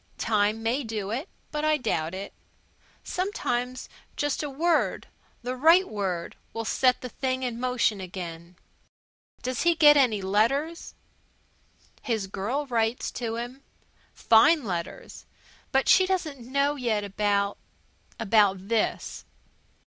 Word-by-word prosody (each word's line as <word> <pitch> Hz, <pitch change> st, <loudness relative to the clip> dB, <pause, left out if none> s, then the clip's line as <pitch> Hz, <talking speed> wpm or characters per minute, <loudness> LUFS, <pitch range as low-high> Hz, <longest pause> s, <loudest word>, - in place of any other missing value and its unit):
"Time 215 Hz, 0 st, +1 dB
may 245 Hz, +5 st, 0 dB
do 215 Hz, -3 st, -4 dB
it 270 Hz, -, -3 dB, 0.2 s
but 300 Hz, 0 st, -3 dB
I 310 Hz, 0 st, +3 dB
doubt 180 Hz, -, -2 dB
it. 195 Hz, +1 st, -7 dB, 0.7 s
Sometimes 255 Hz, -10 st, -2 dB, 0.3 s
just 290 Hz, -2 st, -1 dB
a 295 Hz, -, -3 dB
word 330 Hz, +5 st, +1 dB, 0.4 s
the 250 Hz, +1 st, -3 dB
right 330 Hz, +8 st, +5 dB
word 190 Hz, -5 st, -3 dB, 0.2 s
will 225 Hz, 0 st, -4 dB
set 255 Hz, +2 st, +2 dB
the 250 Hz, -, -6 dB
thing 260 Hz, +2 st, -2 dB
in 240 Hz, -2 st, -3 dB
motion 245 Hz, -5 st, +1 dB
again. 175 Hz, -2 st, -8 dB, 0.9 s
Does 255 Hz, -1 st, -2 dB
he 340 Hz, 0 st, +3 dB
get 295 Hz, -2 st, +7 dB
any 225 Hz, -8 st, +3 dB
letters?" 270 Hz, -, 0 dB, 1.1 s
"His 225 Hz, -6 st, -1 dB
girl 225 Hz, +10 st, -3 dB
writes 230 Hz, -2 st, -1 dB
to 230 Hz, -2 st, -4 dB
him. 245 Hz, +3 st, -6 dB, 0.5 s
Fine 245 Hz, +7 st, +5 dB
letters. 175 Hz, -5 st, -6 dB, 0.4 s
But 270 Hz, -1 st, +2 dB
she 375 Hz, 0 st, +6 dB
doesn't 300 Hz, -10 st, -3 dB
know 280 Hz, +1 st, +2 dB
yet 230 Hz, -6 st, -1 dB
about 200 Hz, 0 st, 0 dB, 0.6 s
about 205 Hz, -3 st, +2 dB
this. 230 Hz, -2 st, -1 dB
235 Hz, 125 wpm, -26 LUFS, 205-280 Hz, 1.1 s, get